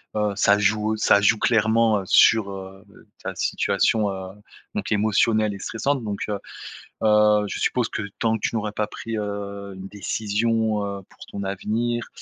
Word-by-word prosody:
Heu, 105 -1 0
ça 100 0 +4
joue 105 +1 +1
ça 105 -1 +4
joue 105 +2 +4
clairement, 110 -1 +3
heu, - - -8
sur, 105 +1 +5
heu, 95 0 -9
beh, 100 - -19 0.2
ta - - -4
situation, 105 -2 +1
heu, 95 0 -7 0.4
donc - - -3
émotionnelle 110 0 +2
et 100 - -8
stressante. 130 +6 -2
Donc, 105 -2 -4
heu 105 -1 -3 0.6
heu, 105 -1 +4
je - - -5
suppose 125 -3 +1
que - - -4 0.2
tant 110 -1 +1
que 110 - -6
tu - - -2
n'aurais 105 -1 -3
pas 105 0 -1
pris, 115 -1 -6
heu, 100 -1 -5
une 95 +1 -8
décision, 110 +2 -1
heu, 100 -1 -5
pour - - -14
ton 100 - -6
avenir, 115 +5 -2
105 Hz, 175 wpm, -23 LUFS, 100-110 Hz, 0.6 s, sur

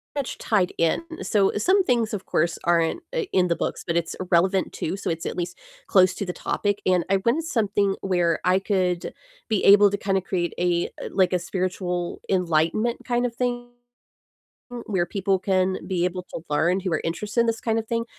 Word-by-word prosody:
much 280 -3 -3
tied 195 -6 +1
in, 165 - +2 0.2
so 200 -3 +2
some 375 - +3
things, 235 -7 +1
of 195 - -4
course, 170 +2 0
aren't, 170 - +2
uh, - - +1
in 180 -1 +3
the 170 - +1
books, - - -3
but 170 - -1
it's 170 -1 -1 0.2
relevant, 185 +3 +2
too, 180 +5 -3
so - - -4
it's 165 0 -3
at - - -4
least 175 0 -4 0.3
close 185 -2 +5
to 200 - -3
the 180 - -4
topic, 205 -1 -2
and 180 -2 +2
I 195 - +4
wanted 300 +8 +2
something 205 -6 +1
where 175 -4 +1
I 185 +1 +4
could 185 -3 -1 0.4
be 215 -3 +1
able 205 +1 +8
to 200 - -1
kinda 195 -1 0
create 175 -2 -2
a 175 -1 +1 0.2
like, 185 -2 +2
a 180 - +2
spiritual 180 -1 -3
enlightenment 180 +5 +1
kind 245 0 0
of 235 -1 -3
thing 245 -1 -2 1.2
where 185 -4 0
people 195 +1 0
can 185 0 +1
be 180 -2 0
able 180 0 -2
to - - -8
learn, 170 +6 +2
who 185 -2 -3
are 155 - +1
interested 205 +8 -1
in 235 - +3
this 225 -1 -1
kind 225 -1 0
of 225 - -4
thing, 230 0 -1
190 Hz, 200 wpm, -24 LUFS, 175-210 Hz, 1.2 s, able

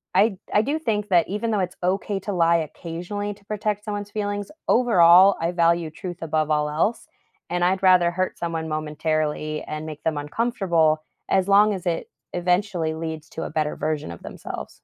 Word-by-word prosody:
I 205 -3 +4 0.2
I 210 - +5
do 300 +5 -1
think 210 -7 -1
that 175 -3 +4
even 210 +3 -2
though 210 - +1
it's 180 - -17
okay 195 +2 0
to 205 - -4
lie 170 -1 +4
occasionally 190 +5 -5
to 200 - -24
protect 210 0 -2
someone's 205 -1 -4
feelings, 205 -1 -3 0.2
overall, 190 -5 +6
I 170 +1 0
value 170 -2 +2
truth 175 +1 -7
above 155 -1 0
all 150 0 +2
else, 170 +10 -1 0.4
and 175 0 0
I'd 190 +2 +1
rather 180 -2 +6
hurt 185 +1 -2
someone 165 -2 -3
momentarily 155 0 -2
and 155 +1 -5
make 155 -1 -8
them 160 -2 0
uncomfortable 160 -2 +1 0.3
as 190 0 +2
long 205 +1 +5
as 185 - -8
it 170 -1 -2 0.2
eventually 180 -2 0
leads 160 -1 -6
to - - -5
a - - -4
better 155 -1 -1
version 155 - -2
of 85 - -11
themselves. - - -7
175 Hz, 180 wpm, -23 LUFS, 160-205 Hz, 0.4 s, overall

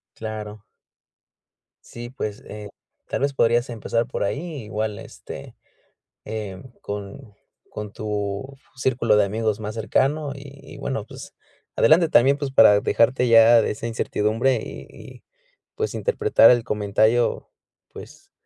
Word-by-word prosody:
Claro. 110 -1 -7 1.2
Sí, 120 0 -8
pues, 110 -5 -6
eh, 105 -1 -8 0.4
tal - - -2
vez 140 0 0
podrías 120 0 +2
empezar 115 0 -2
por 130 - -3
ahí, 120 +8 -2 0.2
igual 105 0 -3
este, - - -10 0.7
eh, 105 -3 -6 0.2
con 105 +3 -7 0.4
con 105 -1 -6
tu 105 +5 -4 0.2
círculo 125 -3 +1
de 105 - +4
amigos 110 +1 -2
más 105 0 -5
cercano, 135 +7 0
y 140 0 -12 0.2
y - - -11
bueno, - - -4
pues, - - -11 0.4
adelante. 160 +6 +4
También, 135 +2 +4
pues, 140 -2 -4
para 105 -5 +6
dejarte 130 -3 +2
ya 115 0 +7
de - - -1
esa 110 +2 -5
incertidumbre, 115 +2 0
y - - -9
y, - - -13 0.5
pues, 440 0 -3
interpretar 440 -3 +4
el 120 -2 +2
comentario, 110 +1 +1 0.4
pues, - - -13
115 Hz, 135 wpm, -23 LUFS, 105-130 Hz, 1.2 s, ya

